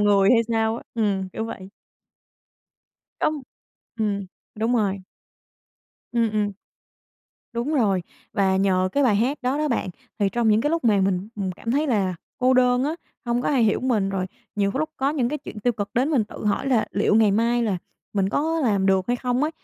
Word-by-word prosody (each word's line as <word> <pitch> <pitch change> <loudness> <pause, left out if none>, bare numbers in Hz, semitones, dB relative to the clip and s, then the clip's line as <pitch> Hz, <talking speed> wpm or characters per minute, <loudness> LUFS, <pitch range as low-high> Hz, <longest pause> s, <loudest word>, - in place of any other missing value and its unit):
người 200 -1 +4
hay 235 - +6
sao 225 0 +1
á, - - -8
ừm, 200 -4 0
kiểu 220 - -3
vậy. 190 -4 -7 1.5
Đúng 305 -3 0 0.5
ừm, 205 -3 -1 0.3
đúng 225 +3 0
rồi. 200 -3 +1 1.1
Ừm, 230 -2 +2
ừm. 210 -1 0 1.0
Đúng 240 +6 -1
rồi, 200 -9 +2 0.3
và 195 -3 +2
nhờ 185 -1 +2
cái 285 - +2
bài 230 -7 +4
hát 255 +8 +1
đó 255 +3 0
đó 305 0 0
bạn, 235 -7 -1 0.3
thì 200 -2 +2
trong 230 +2 +1
những 215 +1 +4
cái 295 +5 0
lúc 330 -5 -1
mà 210 -3 +4
mình, 190 +1 0
ừm, 195 -2 -2
cảm 230 +5 -5
thấy 290 +4 +1
là 200 -8 +1 0.2
cô 255 +1 +3
đơn 250 0 +4
á, 305 - -1 0.3
hông 240 0 0
có - - 0
ai 270 -5 +3
hiểu 210 - +2
mình 225 -7 +1
rồi 190 -1 -2 0.3
nhiều 200 -1 +2
cái - - -3
lúc 310 +1 -1
có 270 +1 +1
những 270 -6 0
cái 300 +3 -3
chuyện 220 -6 -9
tiêu 245 +3 +2
cực 205 -2 -4
đến 255 +4 +2
mình 260 -8 +2
tự 210 - -9
hỏi 210 +6 0
là 245 -5 +2
liệu 205 +1 +2
ngày 220 -1 +5
mai 235 +4 +2
là 210 -5 0 0.4
mình 195 -2 +1
có 320 +9 0
làm 200 -5 +2
được 190 -1 +2
hay 245 - +2
không 250 +1 -1
ấy, 305 - +1
225 Hz, 210 wpm, -24 LUFS, 200-250 Hz, 1.5 s, hay